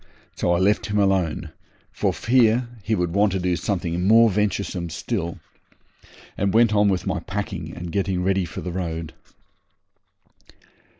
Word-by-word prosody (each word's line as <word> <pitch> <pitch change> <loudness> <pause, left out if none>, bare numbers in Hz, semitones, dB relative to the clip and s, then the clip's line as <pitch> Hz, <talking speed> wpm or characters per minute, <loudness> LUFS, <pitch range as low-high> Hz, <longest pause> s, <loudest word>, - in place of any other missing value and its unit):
So 85 - 0
I - - +2
left 100 +4 +2
him 105 0 -1
alone, 90 -6 +1 0.4
for - - 0
fear 120 0 +2
he 110 +3 0
should 90 -3 -1
want 100 0 +3
to 95 - 0
do 90 -1 0
something 90 0 -2
more 115 +1 +6
venturesome 100 -3 -1
still, 85 0 -3 1.0
and 100 +1 0
went 115 -1 +5
on 105 -1 +4
with 95 -2 -1
my 95 -2 -1
packing 90 -2 -5
and 85 -1 -6
getting 95 -1 -1
ready 95 -1 +1
for - - -7
the 90 - -5
road. 85 -3 -4
95 Hz, 155 wpm, -23 LUFS, 85-105 Hz, 1.0 s, more